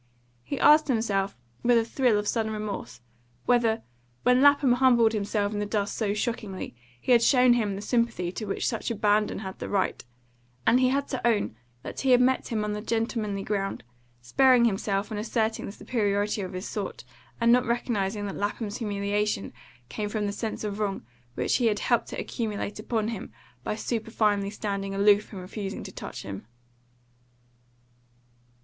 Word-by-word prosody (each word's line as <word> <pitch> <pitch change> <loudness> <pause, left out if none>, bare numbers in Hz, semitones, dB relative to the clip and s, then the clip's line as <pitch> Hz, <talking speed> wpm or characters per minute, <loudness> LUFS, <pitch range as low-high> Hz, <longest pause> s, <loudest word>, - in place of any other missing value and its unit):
He 125 - -4
asked 305 +1 +6
himself, 205 -6 0 0.2
with 240 0 +4
a 225 - +2
thrill 240 -2 +2
of 210 0 -2
sudden 220 -1 0
remorse, 210 - -5 0.4
whether, 230 -2 +2 0.4
when 250 +1 +4
Lapham 285 -2 +6
humbled 245 -3 +4
himself 205 0 -1
in 205 - -2
the 210 - -1
dust 205 -1 -1
so 205 -2 0
shockingly, 210 - -3 0.2
he 250 - -2
had 240 -2 +7
shown 250 0 +5
him 215 -5 0
the 200 - -6
sympathy 230 -8 0
to 215 - -5
which 195 - -1
such 230 - -2
ABANDON 210 -2 +1
had 190 -1 -7
the - - -5
right; 200 -2 0 0.6
and 240 +3 +5
he 255 -1 +4
had 280 +2 0
to 260 - -3
own 210 - +1 0.3
that - - -6
he 270 - 0
had 250 -1 +7
met 255 +1 +2
him 220 -3 -1
on 210 0 -2
the 210 - -4
gentlemanly 225 -3 -1
ground, 195 - -2 0.4
sparing 255 - +5
himself 200 0 0
and 210 - -3
asserting 220 0 -1
the - - -5
superiority 205 -2 -1
of 185 -1 -5
his 185 +1 -5
sort, 205 -3 -5 0.4
and 235 0 +4
not 250 0 +4
recognising 210 -4 -1
that 200 - -4
Lapham's 205 +1 -3
humiliation 205 - -1 0.3
came 210 - -4
from 210 -1 -1
the 200 - -1
sense 220 +2 -4
of 210 -1 -3
wrong, 200 - -2 0.3
which - - +1
he 245 -3 +2
had 210 -2 +2
helped - - +1
to - - -6
accumulate 210 -3 -3
upon 220 0 -1
him 225 - -6 0.3
by - - -2
superfinely 215 -3 0
standing 200 -2 -3
aloof 205 +1 +4
and 195 -3 -7
refusing 195 +1 -5
to - - -8
touch - - -7
him. 100 +1 -7
215 Hz, 175 wpm, -27 LUFS, 200-235 Hz, 0.6 s, had